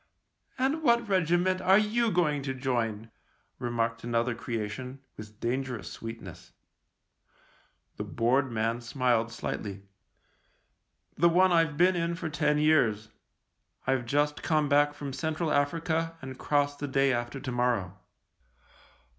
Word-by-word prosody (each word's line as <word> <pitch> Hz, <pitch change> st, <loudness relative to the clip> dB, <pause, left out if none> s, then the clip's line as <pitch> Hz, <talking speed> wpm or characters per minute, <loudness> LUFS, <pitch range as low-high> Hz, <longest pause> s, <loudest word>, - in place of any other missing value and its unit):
" -, -, -52 dB, 0.2 s
And 270 Hz, +5 st, 0 dB
what 235 Hz, -5 st, +3 dB
regiment 185 Hz, 0 st, +2 dB
are 190 Hz, +1 st, +5 dB
you 220 Hz, +2 st, +2 dB
going 150 Hz, -6 st, +1 dB
to 135 Hz, -1 st, -3 dB
join? 115 Hz, -4 st, -2 dB, 0.2 s
" -, -, -43 dB
remarked 115 Hz, -1 st, -2 dB
another 120 Hz, +1 st, 0 dB
creation, 120 Hz, +3 st, -5 dB, 0.2 s
with 105 Hz, 0 st, -11 dB
dan 125 Hz, +3 st, -1 dB
gerous 125 Hz, -6 st, -6 dB
sweetness. 115 Hz, 0 st, -9 dB, 1.4 s
The -, -, -3 dB
bored 125 Hz, +3 st, +1 dB
man 115 Hz, +1 st, -1 dB
smiled 120 Hz, -2 st, 0 dB
slightly. 100 Hz, -3 st, -5 dB, 0.7 s
" -, -, -44 dB
The 170 Hz, +2 st, +6 dB
one 185 Hz, +2 st, +4 dB
I've 165 Hz, -3 st, +2 dB
been 180 Hz, +2 st, +4 dB
in 170 Hz, 0 st, -1 dB
for 170 Hz, -2 st, -4 dB
ten 150 Hz, 0 st, +1 dB
years. 115 Hz, -9 st, +2 dB, 0.8 s
I've 130 Hz, -2 st, 0 dB
just 145 Hz, +3 st, +1 dB
come 155 Hz, -3 st, +1 dB
back 145 Hz, +1 st, +3 dB
from 140 Hz, -2 st, -6 dB
Central 160 Hz, +3 st, -2 dB
Africa 165 Hz, +3 st, 0 dB
and 130 Hz, 0 st, -9 dB
cross 145 Hz, -1 st, +1 dB
the 145 Hz, 0 st, -5 dB
day 135 Hz, 0 st, +2 dB
after 120 Hz, +3 st, -3 dB
to 130 Hz, -2 st, -5 dB
morrow." 120 Hz, -6 st, -1 dB
140 Hz, 140 wpm, -29 LUFS, 120-165 Hz, 1.4 s, The